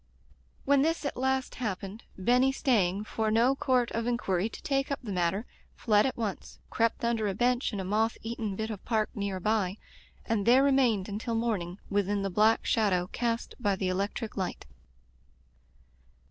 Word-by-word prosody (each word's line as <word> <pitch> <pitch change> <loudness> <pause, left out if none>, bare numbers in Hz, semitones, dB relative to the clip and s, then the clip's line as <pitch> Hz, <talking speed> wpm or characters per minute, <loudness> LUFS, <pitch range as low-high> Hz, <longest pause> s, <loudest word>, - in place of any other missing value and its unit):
When 280 0 +4
this 325 +1 0
at 285 - -2
last 265 +1 0
happened, 200 -1 -4
Benny, 250 +7 +3
stay 235 -9 +2
ing 195 +3 -4
for 220 0 -2
no 230 +4 +4
court 255 -4 +1
of 230 +1 -2
inquiry 210 -5 0
to - - -11
take 275 0 0
up 280 - -1
the 215 - -5
matter, 185 +4 0 0.3
fled 210 0 +3
at 260 - -4
once, 215 -5 -4
crept 230 +1 +1
under 230 -2 +1
a 195 - -2
bench 245 +3 +1
in 205 - -4
a - - -2
moth 215 +4 0
eaten 225 -3 -3
bit 220 +2 -3
of 205 - -7
park 220 -2 0
near 200 -2 -3
by, 205 -1 0 0.5
and 220 -3 -1
there 255 +3 +6
remained 255 -8 +3
until 220 +3 -3
morning, 205 -6 -1
within 200 0 +1
the 195 - -2
black 215 +4 +3
shadow 185 -5 +1
cast 235 -1 -2
by 205 -5 +1
the 190 -1 -1
electric 200 +4 -2
light. 190 -2 -3
220 Hz, 175 wpm, -29 LUFS, 200-245 Hz, 0.5 s, there